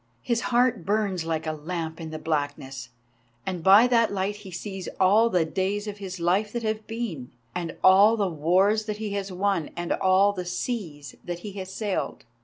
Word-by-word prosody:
His 235 -1 0
heart 240 -5 +2
burns 195 -3 0
like 160 -1 -2
a 155 - -1
lamp 160 +1 -5
in 160 - -6
the 155 - -5
blackness, 145 -5 -3 0.6
and 180 -3 -3
by 200 +6 +8
that 235 -2 +3
light 200 +1 -2
he 205 -2 -11
sees 190 +1 -6
all 210 +5 +5
the 180 -6 +2
days 195 +5 -1
of 205 -1 -6
his 190 -2 -6
life 190 +5 +1
that 240 -1 -3
have 220 0 -2
been, 220 - -4 0.2
and 170 -2 -4
all 200 +4 +7
the 200 -2 +1
wars 185 +7 +2
that 210 -1 -3
he 215 -1 -4
has 200 -1 -3
won, 185 -3 0
and 175 0 -4
all 190 +2 +3
the 185 -2 -4
seas 175 - -4
that 175 0 -5
he 210 - -6
has 190 -1 -7
sailed. 200 0 -3
190 Hz, 195 wpm, -26 LUFS, 170-210 Hz, 0.6 s, by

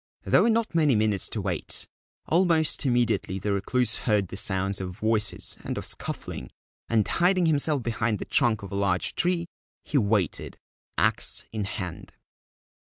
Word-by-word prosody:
There - - +4
were 235 - +3
not 225 -2 +1
many 155 -6 +3
minutes 105 -2 +1
to 110 - -3
wait. 90 -3 -2 0.4
Almost 165 -4 +2
immediately 120 -6 +1
the 100 +1 -1
Recluse 120 +6 +1
heard 100 -4 +2
the - - -7
sounds 95 0 +1
of 90 0 -6
voices 110 -1 -1
and - - -4
of - - -4
scuffling, 65 - -5 0.4
and, 110 -3 +2
hiding 180 0 +2
himself 150 -3 +2
behind 115 -2 -1
the - - -6
trunk 110 -4 +2
of 100 - -8
a - - -4
large 100 -2 0
tree, 175 0 +1 0.4
he 145 - +1
waited, 100 - -1 0.4
axe - - +3
in 110 -2 -3
hand. 95 -3 -6
110 Hz, 155 wpm, -26 LUFS, 100-150 Hz, 0.4 s, There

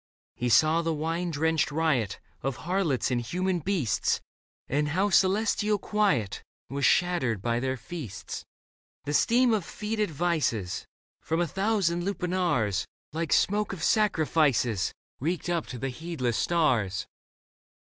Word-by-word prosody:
He 125 - -1
saw 155 +9 +5
the 165 -1 -1
wine 165 +3 -2
drenched 160 -2 +1
riot 145 -9 0 0.2
Of 135 -1 -2
harlots 170 -8 +1
and 120 -1 +1
human 180 +8 -1
beasts, 165 - 0 0.5
And 150 +2 +1
how 190 +7 +1
celestial 210 +2 +3
quiet 150 - 0 0.3
Was 140 -1 0
shattered 150 - +2
by 115 +4 0
their 130 +1 -1
feasts. 125 - -7 0.6
The 145 - -2
steam 240 - +4
of 210 -4 +1
fetid 210 +3 -2
vices 145 - -1 0.3
From 160 +1 -1
a 175 - +2
thousand 190 -1 0
lupanars. 175 - 0 0.3
Like 165 -1 -2
smoke 210 0 +2
of 190 - -6
sacrifices, 150 - +2 0.3
Reeked 170 +5 -2
up 170 -2 -1
to 125 - -6
the 135 +3 -3
heedless 130 -4 -3
stars. 110 - +1
160 Hz, 130 wpm, -28 LUFS, 130-185 Hz, 0.6 s, saw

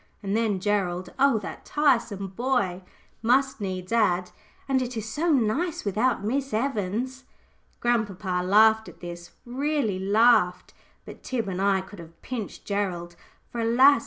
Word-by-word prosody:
And 200 +1 -1
then 220 -4 +1
Gerald 185 -3 -1
oh, 275 -3 +5
that 200 - -8
tiresome 230 -9 +1
boy! 200 -4 -1 0.4
must 260 +2 +2
needs 185 -1 -4
add 185 -6 +2 0.4
"And 265 -1 +2
it 250 -1 -4
is 220 -1 -4
so 300 +10 -1
nice 295 +7 0
without 220 +4 +1
Miss 265 +3 -1
Evans!" 250 +2 -2 0.6
Grandpapa 205 -6 0
laughed 220 +3 +5
at - - -16
this, 175 0 -8 0.2
really 260 -5 -1
laughed; 195 -2 +3 0.3
but - - -11
Tib 235 -5 -3
and 190 -1 -3
I 195 -1 +3
could 190 +1 -12
have 165 0 -13
pinched 235 -5 -6
Gerald. 180 -4 -2 0.4
For, 240 - -5
alas! 250 +4 +6
220 Hz, 145 wpm, -26 LUFS, 190-255 Hz, 0.6 s, alas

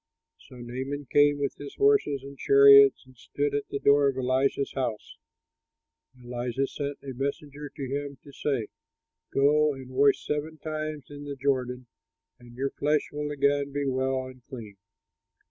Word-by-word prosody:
So - - -13
Naaman 130 +4 -5
came 145 0 +4
with 140 -1 -2
his 145 -1 -9
horses 410 - +2
and 140 0 -10
chariots 140 0 +6
and 130 0 -19
stood 145 +4 -3
at 145 0 -2
the - - -3
door 140 0 +4
of 135 - -4
Elisha's 130 +2 0
house. 120 -5 -4 1.0
And 125 -1 -18
Elisha 125 +2 -1
sent 140 +1 -5
a 135 -1 -6
messenger 140 +2 -5
to 135 -1 -7
him 140 +1 -4
to 145 - -13
say, 135 -6 -2 0.6
"Go 150 +1 +3
and 130 -1 -11
wash 140 +2 +3
seven 150 +2 -3
times 155 -2 -5
in 145 0 -9
the 140 -1 -5
Jordan 130 -2 -1 0.5
and 120 -1 -15
your 135 +2 -2
flesh 150 +1 0
will 150 0 -4
again 140 0 +1
be 145 0 -1
well 130 0 -1
and 130 0 -12
clean." 115 -7 -9
140 Hz, 165 wpm, -27 LUFS, 130-145 Hz, 1.0 s, chariots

